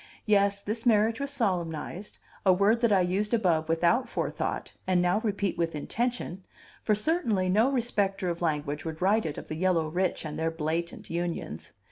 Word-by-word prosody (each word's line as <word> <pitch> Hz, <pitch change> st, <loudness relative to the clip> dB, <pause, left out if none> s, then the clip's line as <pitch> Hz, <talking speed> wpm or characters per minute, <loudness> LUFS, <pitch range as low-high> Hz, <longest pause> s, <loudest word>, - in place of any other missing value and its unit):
Yes, 200 Hz, -1 st, +2 dB
this 225 Hz, +2 st, -3 dB
marriage 225 Hz, -1 st, +3 dB
was 280 Hz, 0 st, -2 dB
solemnized, 185 Hz, -, -2 dB, 0.3 s
a 190 Hz, -, +5 dB
word 200 Hz, +5 st, +3 dB
that 235 Hz, -3 st, +3 dB
I 195 Hz, -2 st, +5 dB
used 200 Hz, +5 st, +1 dB
above 170 Hz, -8 st, +1 dB
without 175 Hz, +10 st, +2 dB
forethought, -, -, -3 dB
and 185 Hz, -1 st, +3 dB
now 180 Hz, +3 st, +2 dB
repeat 200 Hz, -5 st, -1 dB
with 165 Hz, -2 st, 0 dB
intention; 220 Hz, -, -3 dB, 0.4 s
for 215 Hz, -, +2 dB
certainly 215 Hz, -, +1 dB
no 220 Hz, +8 st, +3 dB
respecter 205 Hz, -7 st, 0 dB
of 170 Hz, 0 st, -2 dB
language 150 Hz, -3 st, -1 dB
would 160 Hz, -1 st, -5 dB
write 205 Hz, +2 st, +2 dB
it 150 Hz, -, -5 dB
of -, -, -7 dB
the -, -, -4 dB
yellow 165 Hz, -1 st, +1 dB
rich 180 Hz, +2 st, -1 dB
and 150 Hz, 0 st, -5 dB
their 165 Hz, 0 st, +1 dB
blatant 165 Hz, +2 st, -3 dB
unions. 170 Hz, -, -4 dB
185 Hz, 175 wpm, -28 LUFS, 165-215 Hz, 0.4 s, a